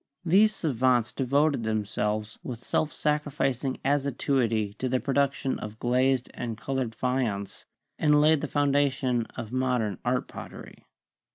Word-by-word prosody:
These 205 +5 +5
savants 125 -5 +1
devoted 140 +1 +2
them 110 -1 -1
selves 105 +1 -2
with 125 - -5
self 155 - 0
sacrificing 140 -3 -1
assiduity 135 -6 +1
to 130 - -1
the 130 0 +1
production 135 0 0
of 105 0 -7
glazed 125 +2 +1
and 115 -3 -5
colored 130 -2 -3
faience, 115 -5 -2 0.3
and 150 -1 +4
laid 155 0 +4
the 150 - -2
foundation 140 -4 +1
of 115 -3 -5
mod 130 -1 +1
ern 105 -4 -2
art - - 0
pottery. - - -11
130 Hz, 135 wpm, -27 LUFS, 115-140 Hz, 0.3 s, These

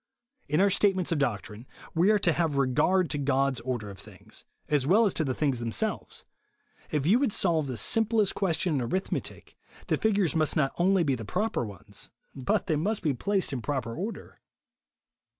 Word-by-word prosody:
In 150 +2 +1
our 200 0 +4
statements 190 -3 +2
of 165 - +1
doctrine, 115 -2 -3 0.3
we 170 +4 +3
are 215 - +5
to 175 -4 +2
have 160 -4 0
regard 150 +8 +2
to 145 - -1
God's 135 -2 +1
order 115 -4 -4
of 95 - -12
things, 105 -3 -13 0.2
a^ 145 -3 +1
well 210 +7 +5
as 200 - +1
to 160 - 0
the 130 -4 -2
things 140 -5 0
themselves. 115 -1 -2 0.6
If 145 -2 -1
you 210 +9 +4
would 275 -5 +1
solve 165 -7 +1
the 125 -3 -4
sim 225 - +2
plest 215 -3 +1
question 175 -2 0
in 140 - 0
arithmetic, 185 +11 -4 0.3
the - - +2
figures 200 -6 +1
must 155 -1 +2
not 135 -3 +1
only 185 +1 +3
be 140 -4 +1
the 115 -3 -4
proper 200 - -1
ones, 100 -6 -8 0.2
but 130 -2 -1
they 155 - 0
must 205 +8 -1
be 150 -4 +1
placed 195 +3 -1
in 125 - -3
proper 120 -3 -3
order. 205 +6 -6
150 Hz, 190 wpm, -28 LUFS, 130-190 Hz, 0.6 s, are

